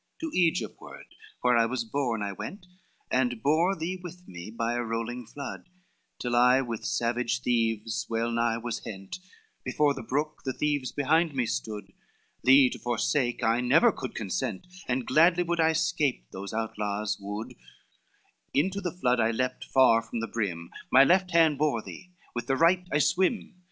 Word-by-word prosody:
XXXIV - - -49
"To 325 -1 -3
Egypt 170 -3 +1
ward, - - -11 0.4
where 125 -1 +4
I 115 - +3
was 120 0 -2
born, 115 -2 -2
I 100 - -2
went, 180 - -8 0.5
And 125 -2 +1
bore 165 +7 +3
thee 175 +3 -3
with 180 0 -10
me, 85 +2 -9
by 115 +1 -2
a 120 - -1
rolling 115 +1 -4
flood, 140 +6 -8 0.5
Till 120 -1 -2
I 125 +2 +5
with 115 -4 -5
savage 120 +1 0
thieves 115 -2 0
well 115 +1 -1
nigh 115 -1 +1
was 115 0 -5
hent; 95 - -7 0.4
Before 150 -1 +2
the - - -7
brook, 145 +6 -2
the 130 - -2
thieves 145 -3 -1
behind 155 +2 +1
me 125 -2 +1
stood: 110 -2 -4 0.5
Thee 130 +2 +7
to - - -7
forsake 120 +1 0
I 115 +2 +2
never 145 - +5
could 130 - -7
consent, 110 - -3 0.2
And 125 -1 -1
gladly 170 +3 +4
would 170 0 -2
I 160 0 +4
'scape 155 - 0
those 100 +1 -7
outlaws 105 -2 -2
wood, 105 +2 -6 1.0
Into 190 +8 +1
the 180 -3 -2
flood 125 -7 +2
I 110 -1 +3
leaped 125 +2 -2
far 130 -4 +5
from 115 +1 -6
the 115 - -3
brim, 90 -8 -3 0.2
My 135 - +8
left 185 +5 +3
hand 165 -4 +4
bore 145 -8 +1
thee, 180 - -10 0.2
with 120 - -4
the 135 - +2
right 180 +3 +3
I - - +2
swim. 190 - +1
125 Hz, 175 wpm, -28 LUFS, 115-155 Hz, 1.0 s, My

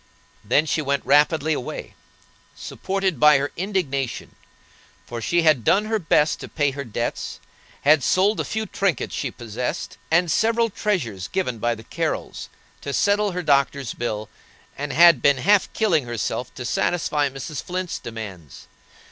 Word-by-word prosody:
Then 125 +8 +2
she 155 - 0
went 140 -1 -1
rapidly 150 +3 +3
away, 125 - -5 0.6
supported 190 -2 -3
by 150 -1 +7
her 140 +1 -2
indignation, 160 - -3 0.7
for 120 -1 -6
she 170 +9 +1
had 155 -7 +4
done 200 - +3
her 220 0 0
best 155 -3 +2
to - - -7
pay 145 -3 0
her 140 +1 -5
debts; 120 -1 -4 0.4
had 150 +1 +5
sold 200 +4 +3
the - - -1
few 220 0 -3
trinkets 195 -5 -1
she 135 - -2
possessed, 120 +6 -5
and 170 +1 +3
several 230 +3 +2
treasures 115 - -2
given 125 -12 -2
by 120 +2 0
the 110 - -12
Carrols, - - -4 0.3
to 140 - -5
settle 205 +2 +2
her 180 0 -3
doctor's 140 -3 +1
bill, 110 -3 -4 0.5
and 145 0 -4
had 170 -5 +6
been 140 -1 +4
half 200 +9 +3
killing 170 - +1
herself 120 +1 -3
to 125 - -6
satisfy 145 +3 0
Mrs. 135 +2 -6
Flint's 180 0 -4
demands. 100 - -9
145 Hz, 155 wpm, -23 LUFS, 125-180 Hz, 0.7 s, by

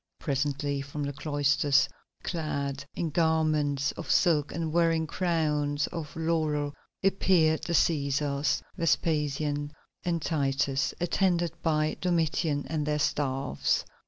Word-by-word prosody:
Presently 140 0 -1
from 140 +1 -5
the 140 0 -3
cloisters, 145 -1 +2 0.4
clad 140 -4 -3
in 165 -2 -2
garments 155 -3 +1
of 165 - -8
silk 155 -5 +3
and 160 -1 -3
wearing 165 -1 +3
crowns 150 -4 0
of 160 -3 -6
laurel, 155 -3 0 0.3
appeared 180 -5 +3
the 170 - -2
Cæsars, 140 -2 +1
Vespasian 150 -3 0 0.3
and 175 -2 0
Titus, 140 -3 0
attended 175 -1 +1
by 155 -1 +1
Domitian 160 -4 0
and 155 -2 -1
their 150 0 +1
staffs. 135 - 0
150 Hz, 110 wpm, -28 LUFS, 145-165 Hz, 0.4 s, silk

